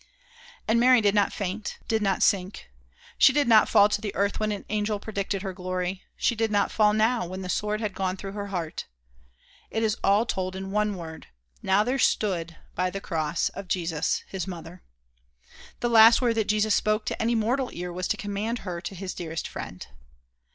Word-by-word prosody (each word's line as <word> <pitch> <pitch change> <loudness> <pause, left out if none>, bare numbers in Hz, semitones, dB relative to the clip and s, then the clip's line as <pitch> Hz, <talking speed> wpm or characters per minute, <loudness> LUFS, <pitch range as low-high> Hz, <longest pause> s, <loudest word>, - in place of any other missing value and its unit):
And 225 +2 +3
Mary 250 +1 +6
did 205 -2 +2
not 205 -2 +2
faint 200 +1 -4
did 220 -1 +1
not 195 -2 +1
sink. 190 - 0 0.5
She - - +8
did 290 0 +1
not 220 -2 +6
fall 205 -2 +6
to 210 - -1
the 210 -3 -4
earth 200 +1 0
when 215 0 0
an 205 - -5
angel 210 0 -1
predicted 200 -2 -3
her 190 -2 -4
glory; 185 +1 -3 0.2
she - - +2
did 225 -1 0
not 205 -1 +1
fall 210 -1 +4
now, 220 -1 +1
when 185 +2 -6
the 180 - -6
sword 210 +3 -1
had 210 -3 -2
gone 190 0 -2
through 195 0 -6
her 205 0 -5
heart. 175 -5 -4 0.8
It 225 - -1
is 215 -1 +1
all 205 +3 +4
told 185 -4 -3
in 190 0 -6
one 210 0 0
word, 160 -2 -9 0.3
"Now 190 +2 +3
there 255 +4 -1
stood 170 -9 +1 0.2
by 185 +1 0
the 195 - -5
cross 160 -3 -1
of 195 -1 -9
Jesus 165 -4 -1
his 190 -3 -5
mother." 175 -1 -8 1.0
The 240 - +1
last 225 0 +8
word 240 -2 +2
that 220 -2 0
Jesus 215 0 +2
spoke 215 +1 +1
to - - -3
any 230 +1 +1
mortal 245 +4 0
ear 175 0 -6
was 180 +1 -3
to - - -1
commend 210 +3 -3
her 175 -2 -4
to 190 - -6
his 190 0 -5
dearest 165 -2 -5
friend. - - -7
200 Hz, 200 wpm, -26 LUFS, 185-215 Hz, 1.0 s, She